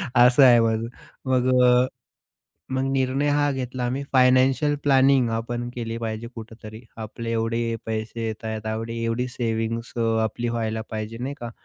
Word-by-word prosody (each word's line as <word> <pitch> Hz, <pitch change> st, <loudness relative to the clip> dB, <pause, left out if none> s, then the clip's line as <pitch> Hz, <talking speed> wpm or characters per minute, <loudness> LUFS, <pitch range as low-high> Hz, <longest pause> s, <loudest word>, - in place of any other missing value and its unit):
असं 125 Hz, +3 st, +6 dB
आहे 120 Hz, -2 st, +7 dB
माझं. 115 Hz, 0 st, +1 dB, 0.4 s
मग 130 Hz, -1 st, +1 dB, 0.2 s
अ, 125 Hz, +1 st, +5 dB, 0.9 s
मग 130 Hz, 0 st, 0 dB
निर्णय 135 Hz, +2 st, +1 dB
हा 145 Hz, 0 st, +2 dB
घेतला, 125 Hz, -1 st, -4 dB
आम्ही 130 Hz, +3 st, -2 dB
फायनान्शियल 130 Hz, +3 st, +4 dB
प्लॅनिंग 135 Hz, -3 st, +4 dB
आपण 120 Hz, +2 st, -3 dB
केली 115 Hz, -1 st, -4 dB
पाहिजे 110 Hz, 0 st, -4 dB
कुठेतरी. 110 Hz, -1 st, -10 dB, 0.2 s
आपले 115 Hz, +1 st, -6 dB
एवढे 115 Hz, 0 st, -1 dB
पैसे 110 Hz, +1 st, -3 dB
येत 110 Hz, 0 st, -6 dB
आहेत. 110 Hz, -1 st, -4 dB
एवढी 115 Hz, +1 st, -3 dB
एवढी 115 Hz, +2 st, -1 dB
सेव्हिंग्स 115 Hz, -1 st, -3 dB
अ, -, -, -1 dB, 0.2 s
आपली 120 Hz, +2 st, -3 dB
व्हायला 110 Hz, -1 st, -2 dB
पाहिजे, 110 Hz, +1 st, -5 dB
नाही 135 Hz, +3 st, -4 dB
का? 120 Hz, -1 st, -5 dB
115 Hz, 155 wpm, -24 LUFS, 115-130 Hz, 0.9 s, आहे